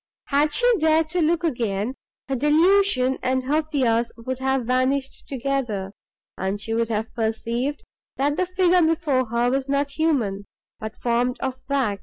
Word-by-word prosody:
Had 295 Hz, +2 st, +3 dB
she 485 Hz, -, +2 dB
dared 315 Hz, 0 st, +2 dB
to 360 Hz, -, +1 dB
look 335 Hz, +2 st, +1 dB
again, 230 Hz, -, -1 dB, 0.3 s
her 270 Hz, -, -1 dB
delusion 295 Hz, -1 st, +3 dB
and 260 Hz, 0 st, 0 dB
her 295 Hz, +4 st, +1 dB
fears 245 Hz, -7 st, 0 dB
would 255 Hz, +2 st, -5 dB
have 265 Hz, -2 st, 0 dB
vanished 260 Hz, +2 st, 0 dB
together, 245 Hz, -8 st, -2 dB, 0.5 s
and 190 Hz, +2 st, -2 dB
she 225 Hz, +2 st, -3 dB
would 230 Hz, 0 st, 0 dB
have 220 Hz, 0 st, -2 dB
perceived, 235 Hz, +5 st, -2 dB, 0.3 s
that 285 Hz, +2 st, +1 dB
the 365 Hz, +2 st, 0 dB
figure 365 Hz, -1 st, +3 dB
before 315 Hz, -5 st, +2 dB
her 235 Hz, +2 st, +1 dB
was 270 Hz, +1 st, -1 dB
not 280 Hz, 0 st, 0 dB
human, 255 Hz, -11 st, 0 dB, 0.3 s
but 220 Hz, 0 st, -6 dB
formed 245 Hz, +1 st, 0 dB
of 260 Hz, -1 st, -4 dB
wax. 255 Hz, -8 st, 0 dB
265 Hz, 160 wpm, -23 LUFS, 235-300 Hz, 0.5 s, Had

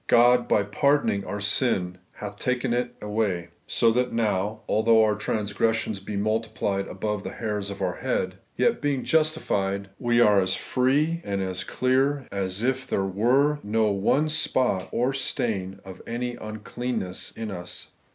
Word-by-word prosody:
God, 120 Hz, +1 st, +5 dB
by 105 Hz, -, +3 dB
par 140 Hz, +8 st, +3 dB
doning 100 Hz, -8 st, -1 dB
our 105 Hz, -, -3 dB
sin, 100 Hz, -4 st, +1 dB
hath 105 Hz, 0 st, -8 dB
taken 125 Hz, -1 st, 0 dB
it 120 Hz, 0 st, -1 dB
away; 105 Hz, -5 st, -1 dB, 0.2 s
so 115 Hz, -, +3 dB
that 125 Hz, +2 st, +1 dB
now, 105 Hz, -1 st, 0 dB
although 110 Hz, +1 st, +4 dB
our 105 Hz, -1 st, +3 dB
transgressions 105 Hz, 0 st, -1 dB
be 100 Hz, +1 st, -5 dB
multiiilied 110 Hz, -2 st, -1 dB
above 105 Hz, +2 st, -3 dB
the -, -, -6 dB
hairs 105 Hz, -3 st, -3 dB
of 100 Hz, -1 st, -5 dB
our 90 Hz, -1 st, -1 dB
head, -, -, -2 dB, 0.2 s
yet, -, -, +2 dB
being 140 Hz, -3 st, 0 dB
justified, 100 Hz, -12 st, 0 dB
we 120 Hz, -1 st, +2 dB
are 105 Hz, -4 st, +6 dB
as 95 Hz, 0 st, +1 dB
free 145 Hz, +6 st, +1 dB
and 100 Hz, -1 st, -2 dB
as 95 Hz, -1 st, -2 dB
clear 135 Hz, +2 st, +1 dB
as 95 Hz, +1 st, -2 dB
if 130 Hz, +1 st, 0 dB
there 95 Hz, -, 0 dB
were 130 Hz, +10 st, +2 dB
no 110 Hz, 0 st, +1 dB
one 105 Hz, +10 st, +2 dB
spot 125 Hz, -10 st, 0 dB
or 125 Hz, +3 st, +1 dB
stain 100 Hz, -7 st, -2 dB
of 95 Hz, -1 st, -10 dB
any 120 Hz, +1 st, -3 dB
uncleanness 110 Hz, -2 st, -4 dB
in 110 Hz, -2 st, -5 dB
us. 90 Hz, -1 st, -6 dB
110 Hz, 160 wpm, -26 LUFS, 100-125 Hz, 0.2 s, are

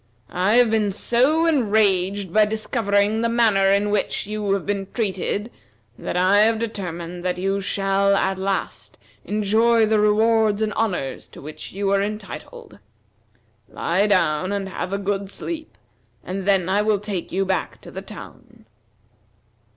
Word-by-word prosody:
I 185 Hz, +5 st, +2 dB
have 245 Hz, -2 st, +5 dB
been 215 Hz, -2 st, +1 dB
so 260 Hz, -, +2 dB
enraged 200 Hz, -, +1 dB
by 215 Hz, 0 st, +5 dB
discovering 215 Hz, -1 st, 0 dB
the 230 Hz, -, +1 dB
manner 220 Hz, -5 st, +3 dB
in 200 Hz, +1 st, +2 dB
which 205 Hz, -1 st, -1 dB
you 210 Hz, -1 st, -2 dB
have 195 Hz, -2 st, -2 dB
been 200 Hz, -1 st, -2 dB
treated 205 Hz, 0 st, -2 dB, 0.4 s
that -, -, -4 dB
I 185 Hz, +3 st, +4 dB
have 220 Hz, +1 st, +4 dB
determined 180 Hz, -6 st, -5 dB
that 180 Hz, -1 st, -1 dB
you 195 Hz, +2 st, -1 dB
shall 195 Hz, 0 st, +1 dB
at 190 Hz, -1 st, 0 dB
last 195 Hz, 0 st, -3 dB, 0.3 s
enjoy 220 Hz, +2 st, +2 dB
the 215 Hz, 0 st, +2 dB
rewards 215 Hz, 0 st, +3 dB
and 215 Hz, -1 st, -1 dB
honors 180 Hz, -13 st, -2 dB
to -, -, -14 dB
which 150 Hz, +2 st, -9 dB
you 195 Hz, 0 st, -1 dB
are 200 Hz, 0 st, +3 dB
entitled. 200 Hz, -, -7 dB, 0.9 s
Lie 190 Hz, +5 st, 0 dB
down 185 Hz, -3 st, +1 dB
and 200 Hz, -1 st, -3 dB
have 185 Hz, 0 st, -5 dB
a 200 Hz, -, 0 dB
good 200 Hz, 0 st, -2 dB
sleep, 315 Hz, +8 st, -7 dB, 0.5 s
and 190 Hz, +1 st, -5 dB
then 190 Hz, -3 st, +3 dB
I 195 Hz, +2 st, +2 dB
will 210 Hz, 0 st, +2 dB
take 200 Hz, -3 st, -5 dB
you 195 Hz, +2 st, 0 dB
back 190 Hz, -1 st, -2 dB
to -, -, -12 dB
the -, -, -6 dB
town." -, -, -12 dB
200 Hz, 155 wpm, -22 LUFS, 190-215 Hz, 0.9 s, have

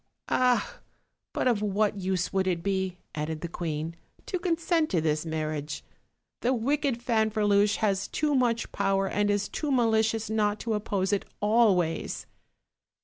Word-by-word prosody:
"Ah! 250 Hz, -1 st, +2 dB, 0.5 s
but -, -, 0 dB
of 230 Hz, -5 st, +2 dB
what 205 Hz, 0 st, +1 dB
use 185 Hz, -1 st, -1 dB
would 190 Hz, -1 st, +1 dB
it 170 Hz, -2 st, 0 dB
be," 190 Hz, -2 st, -1 dB, 0.2 s
added 155 Hz, 0 st, -3 dB
the 170 Hz, -, -3 dB
queen, 160 Hz, -1 st, -4 dB, 0.3 s
"to 370 Hz, -, -2 dB
consent 335 Hz, -2 st, +1 dB
to 175 Hz, -, +1 dB
this 155 Hz, 0 st, 0 dB
marriage? 155 Hz, -2 st, -3 dB, 0.6 s
The 250 Hz, +2 st, +2 dB
wicked 265 Hz, 0 st, 0 dB
Fanferluche 210 Hz, -3 st, +2 dB
has 200 Hz, -3 st, 0 dB
too 300 Hz, -1 st, 0 dB
much 245 Hz, -4 st, +1 dB
power 195 Hz, -1 st, +1 dB
and 205 Hz, +1 st, +1 dB
is 205 Hz, -1 st, +1 dB
too 300 Hz, -, -3 dB
malicious 225 Hz, -3 st, +2 dB
not 210 Hz, -1 st, +1 dB
to 230 Hz, -, -1 dB
oppose 200 Hz, -2 st, -1 dB
it 200 Hz, -, 0 dB
always." 205 Hz, -6 st, +2 dB
205 Hz, 145 wpm, -28 LUFS, 185-230 Hz, 0.6 s, Ah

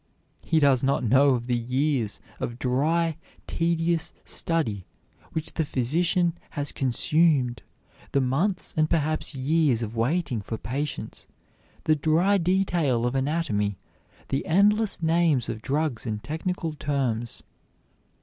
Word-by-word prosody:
He 160 Hz, -, +2 dB
does 140 Hz, -4 st, +4 dB
not 135 Hz, 0 st, +1 dB
know 130 Hz, +3 st, +5 dB
of 120 Hz, -1 st, -4 dB
the 125 Hz, 0 st, 0 dB
years 125 Hz, -1 st, 0 dB, 0.2 s
of 120 Hz, -, -4 dB
dry, 155 Hz, +6 st, +1 dB, 0.3 s
tedious 165 Hz, 0 st, 0 dB
study 115 Hz, -, -2 dB, 0.5 s
which 160 Hz, 0 st, -4 dB
the 160 Hz, -, 0 dB
physician 170 Hz, +6 st, +1 dB, 0.2 s
has 145 Hz, 0 st, -3 dB
consumed, 135 Hz, -2 st, +1 dB, 0.5 s
the 140 Hz, -, +2 dB
months 160 Hz, +10 st, 0 dB
and 155 Hz, 0 st, +2 dB
perhaps 155 Hz, -2 st, 0 dB
years 135 Hz, -3 st, +2 dB
of 110 Hz, +1 st, -5 dB
waiting 125 Hz, 0 st, 0 dB
for 110 Hz, +3 st, -5 dB
patients, 140 Hz, +5 st, -5 dB, 0.6 s
the 155 Hz, -, +3 dB
dry 165 Hz, +7 st, +3 dB
detail 170 Hz, -9 st, +1 dB
of 120 Hz, -, 0 dB
anatomy, 135 Hz, -, 0 dB, 0.5 s
the 135 Hz, -, 0 dB
endless 205 Hz, +2 st, +3 dB
names 160 Hz, -6 st, +2 dB
of 110 Hz, -, -4 dB
drugs 140 Hz, -1 st, -1 dB
and 105 Hz, -1 st, -3 dB
technical 160 Hz, +4 st, -3 dB
terms. 130 Hz, -6 st, -2 dB
145 Hz, 125 wpm, -26 LUFS, 125-165 Hz, 0.6 s, know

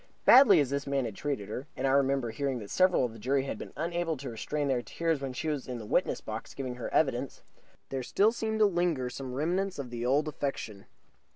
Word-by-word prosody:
Badly 225 Hz, -, +8 dB
as 140 Hz, -3 st, +1 dB
this 140 Hz, 0 st, -2 dB
man 140 Hz, -2 st, 0 dB
had 110 Hz, -, -4 dB
treated 135 Hz, -8 st, -3 dB
her 130 Hz, +6 st, -5 dB
and -, -, -1 dB
I 135 Hz, -, +3 dB
remember 135 Hz, -3 st, +2 dB
hearing 135 Hz, +3 st, -2 dB
that 105 Hz, -4 st, -8 dB
several 185 Hz, -7 st, +4 dB
of 115 Hz, -, -5 dB
the 115 Hz, -, -11 dB
jury 135 Hz, +4 st, +1 dB
had 135 Hz, -, -5 dB
been -, -, -8 dB
unable 170 Hz, -1 st, -1 dB
to 130 Hz, -1 st, -6 dB
restrain 145 Hz, +6 st, -2 dB
their 130 Hz, -3 st, +1 dB
tears 165 Hz, +2 st, -1 dB
when 135 Hz, -1 st, -3 dB
she 125 Hz, +5 st, -4 dB
was 150 Hz, -4 st, -2 dB
in 125 Hz, -1 st, -4 dB
the 110 Hz, -, -7 dB
witness -, -, 0 dB
box -, -, -7 dB
giving 130 Hz, -2 st, -4 dB
her 125 Hz, -, -5 dB
evidence 135 Hz, -3 st, 0 dB, 0.5 s
there 135 Hz, -1 st, -3 dB
still 205 Hz, -, +3 dB
seemed 220 Hz, -2 st, -2 dB
to -, -, +8 dB
linger 170 Hz, -9 st, 0 dB
some 130 Hz, -1 st, -6 dB
remnants 180 Hz, +7 st, -1 dB
of 130 Hz, -4 st, -6 dB
the 120 Hz, -1 st, -4 dB
old 140 Hz, +5 st, +2 dB
affection. 135 Hz, -9 st, -4 dB
140 Hz, 235 wpm, -30 LUFS, 125-160 Hz, 0.5 s, Badly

